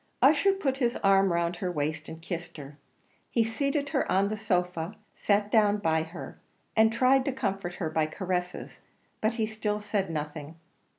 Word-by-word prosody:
Ussher 395 0 +5
put 275 -9 -1
his 245 -2 +1
arm 195 -1 +5
round 170 0 0
her 180 -1 -2
waist 155 -1 -3
and 160 - -8
kissed 170 -2 -5
her; 145 0 -10 0.5
he 230 - +2
seated 280 +5 -1
her - - 0
on 195 +2 +3
the 215 - -2
sofa 180 -3 -1 0.2
sat 205 0 +1
down 210 -2 +4
by 160 -5 +1
her 165 +2 -8 0.4
and 220 0 +5
tried 255 +3 +4
to 275 - +1
comfort 195 -7 -3
her 170 - -2
by 155 -1 +1
caresses: 180 +1 -4 0.4
but 220 +1 +1
he 225 -2 +1
still 215 -1 -2
said 205 -2 -1
nothing. 150 0 -5
195 Hz, 175 wpm, -28 LUFS, 170-220 Hz, 0.5 s, Ussher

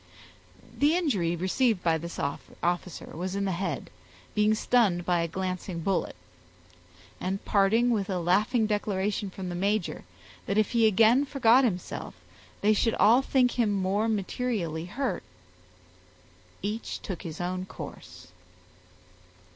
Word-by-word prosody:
The 295 +3 +3
injury 205 - +1
received 190 +4 +1
by 165 -1 +2
this 170 +2 -7
officer 175 +5 -3
was 185 +3 -3
in 200 0 -1
the 195 - 0
head, 175 -4 -3 0.4
being 210 +1 +3
stunned 210 -7 +2
by 175 -1 +2
a 170 - 0
glancing 185 0 -4
bullet; 190 +2 -1 1.0
and 190 +2 -3
parting 220 +5 +3
with 205 -4 0
a 190 - 0
laughing 205 +7 +2
declaration 205 -1 -1
from 185 -1 -6
the - - -4
major, 200 +2 -1 0.4
that 200 - 0
if 215 -2 +2
he 230 -2 +4
again 225 +5 +5
forgot 265 -2 +4
himself, 190 -8 -3 0.5
they 215 +1 +4
should 225 +2 +1
all 230 +5 +5
think 260 -2 +2
him 220 -3 +3
more 200 +3 0
materially 195 -6 -2
hurt, 260 +9 -2 1.4
each 210 +3 -3
took 190 -5 -5
his 160 -2 -7
own 185 +1 -3
course. - - -10
200 Hz, 135 wpm, -28 LUFS, 180-225 Hz, 1.4 s, again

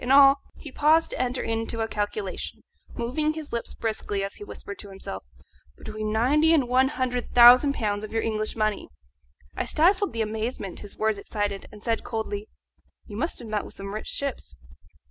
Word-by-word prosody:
In 245 - -4
all 275 0 +8
" - - -35
he 295 - -8
paused 310 +4 +3
to - - -2
enter 255 0 -1
into 225 0 -2
a 225 - 0
calculation, 215 - -3 0.3
moving 290 +6 0
his 310 -4 -8
lips 235 - -3
briskly 215 -3 -2
as 195 - -4
he - - -10
whispered 200 0 -8
to 205 - -8
himself 190 - -7 0.6
"between 215 0 -4
ninety 295 +9 +4
and 275 -6 +2
one 255 +2 +4
hundred 255 -3 -2
thousand 250 +4 +8
pounds 205 -2 -1
of 215 - -6
your 225 0 0
English 215 -1 -1
money." 215 -2 -1 0.7
I - - -1
stifled 375 +5 +3
the 225 -1 0
amazement 215 -3 -4
his 205 - -10
words 220 -2 +1
excited, 205 -1 -3
and 210 0 -13
said 230 -1 0
coldly, 215 -2 -4 0.6
"You 205 - -9
must 315 +10 -2
have 240 - -7
met 215 -1 -1
with - - -10
some 195 0 -6
rich 215 - -5
ships." 275 - -3
225 Hz, 190 wpm, -26 LUFS, 215-265 Hz, 0.7 s, all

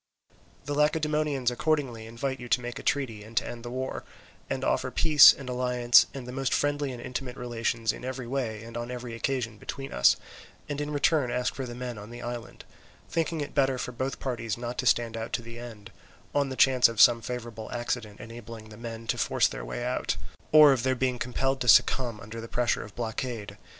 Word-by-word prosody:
"The 145 - -2
Lacedaemonians 150 -3 +1
accordingly 125 -5 -1
invite 130 +4 -3
you 120 -1 -8
to - - +3
make 120 0 -6
a - - -7
treaty 120 -7 -1
and 110 +1 -12
to - - +2
end 120 -1 -7
the 120 - -6
war, 130 +2 -4 0.5
and - - -2
offer - - +1
peace 155 -3 +8
and 135 - -8
alliance 125 -1 +4
and 135 -3 -7
the - - -5
most 135 0 0
friendly 145 -1 0
and 125 - -7
intimate 125 0 -5
relations 115 -2 -1
in - - -10
every 130 -1 -4
way 120 -4 -3
and 115 0 -10
on 120 0 -4
every 125 -1 -6
occasion 115 -2 -2
between 135 -1 -6
us; 60 - +5 0.5
and 145 0 -3
in 150 - -3
return 145 -2 +2
ask 125 +1 -1
for 135 -2 -5
the 120 - -7
men 125 -3 -5
on 105 +2 -10
the 120 +1 -9
island, 120 -1 -7 0.5
thinking 165 -1 -1
it 145 - -5
better 135 -1 +2
for 125 - -4
both 130 +2 -3
parties 115 -4 -3
not 120 0 -5
to 125 - 0
stand 115 -1 +2
out 115 0 -5
to 120 - -1
the 115 0 -9
end, 115 -4 -10 0.4
on 140 -1 +1
the 130 - -4
chance 130 -2 +5
of 115 -2 -6
some 115 +1 +7
favourable 115 -2 -6
accident 120 -3 -3
enabling 115 -1 -10
the 105 - -12
men 115 0 -7
to - - -1
force - - +3
their - - -6
way - - -5
out, - - -1 0.3
or 150 -2 +9
of 130 - -1
their 130 +1 +1
being 125 -1 0
compelled 135 +1 -1
to 125 - -2
succumb 120 0 +4
under 110 +3 -8
the 115 - -7
pressure 120 0 0
of 105 - -11
blockade. 115 -2 -4
125 Hz, 215 wpm, -28 LUFS, 115-135 Hz, 0.5 s, or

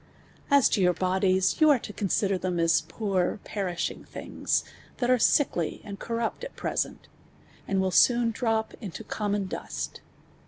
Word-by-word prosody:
As 280 -3 +5
(o 205 - 0
your 180 -1 +3
bodies, 185 - +1
you 310 - +7
are 290 - +7
(o - - -2
C(>nsider 200 -2 -1
(hem 180 -2 -1
as 165 0 +3
poor, 195 -3 -1
(perishiuf; 185 -4 -3
thinj;s, - - -2 0.4
(ha( 250 - +1
are 250 0 +3
sickly 180 - +2
and 200 -1 -8
corrupt 230 - -3
at - - -7
pre - - -3
'Hcn(,and 195 - -5
will 190 0 +1
s«»on 235 +4 +4
droj) 225 -1 -1
into 205 0 -7
connnon 205 -2 -2
dust. - - -5
205 Hz, 155 wpm, -27 LUFS, 185-230 Hz, 0.4 s, you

